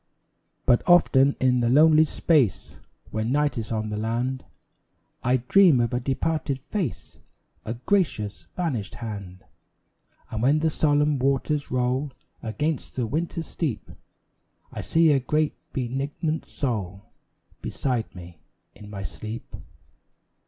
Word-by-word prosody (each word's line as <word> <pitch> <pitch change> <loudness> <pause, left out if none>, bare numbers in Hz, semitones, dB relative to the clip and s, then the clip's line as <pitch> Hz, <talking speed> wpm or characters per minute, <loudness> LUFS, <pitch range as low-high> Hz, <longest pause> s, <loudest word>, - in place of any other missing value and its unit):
But 120 -2 +4
often 140 -6 +5
in 125 -1 +3
the 120 -1 +2
lonely 155 +4 +6
space 145 - +1 0.4
When 110 +2 -1
night 145 +1 +2
is 110 - -6
on 110 -1 -1
the 105 - -3
land, 120 +4 -2 0.8
I 125 +1 +2
dream 155 +3 +5
of 120 +1 0
a 120 - +1
departed 140 +2 -1
face 155 - -5 0.5
A 115 - -3
gracious, 120 - -1
vanished 130 - -2
hand. 100 -5 -7 0.9
And 110 - -3
when 140 +5 +4
the 160 +1 +1
solemn 150 -1 +2
waters 140 +2 0
roll 130 +3 0 0.3
Against 150 +7 -3
the 125 - 0
outer 165 +6 -2
steep, 150 -9 -4 0.8
I - - -5
see 165 -1 +4
a 140 - +4
great, 150 +4 0 0.2
benignant 140 +5 -2
soul 105 - -3 0.6
Beside 125 -6 -2
me 85 -2 -11 0.3
in 105 - -12
my 100 -2 -6
sleep. 110 +4 -7
130 Hz, 125 wpm, -25 LUFS, 115-150 Hz, 0.9 s, lonely